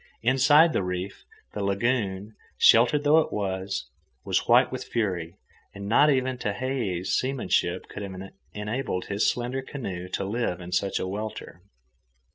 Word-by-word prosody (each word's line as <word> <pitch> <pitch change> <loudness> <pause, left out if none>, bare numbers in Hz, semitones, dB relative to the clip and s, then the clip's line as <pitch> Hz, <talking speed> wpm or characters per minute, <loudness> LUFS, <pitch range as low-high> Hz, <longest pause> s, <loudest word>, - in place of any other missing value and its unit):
Inside 145 +6 +5
the - - +1
reef, 90 +1 -5 0.3
the 105 - -3
lagoon, 100 0 -1 0.2
sheltered 125 +6 +5
though 150 +2 +5
it 160 - -1
was, 95 -7 -3 0.3
was - - 0
white 125 +2 +5
with 130 0 -4
fury, 90 -7 -2 0.4
and 100 0 -7
not 145 +8 +5
even 130 -2 0
Tehei's 105 -5 -2
seamanship 130 0 0
could - - -8
have 100 -2 -6 0.4
enabled 105 -2 -3
his 100 +1 +1
slender 125 +2 -2
canoe 100 -10 -6
to 95 +1 -3
live 100 -4 -2
in 90 0 -9
such 95 +2 0
a - - -2
welter. 100 -3 -6
105 Hz, 145 wpm, -26 LUFS, 95-130 Hz, 0.4 s, Inside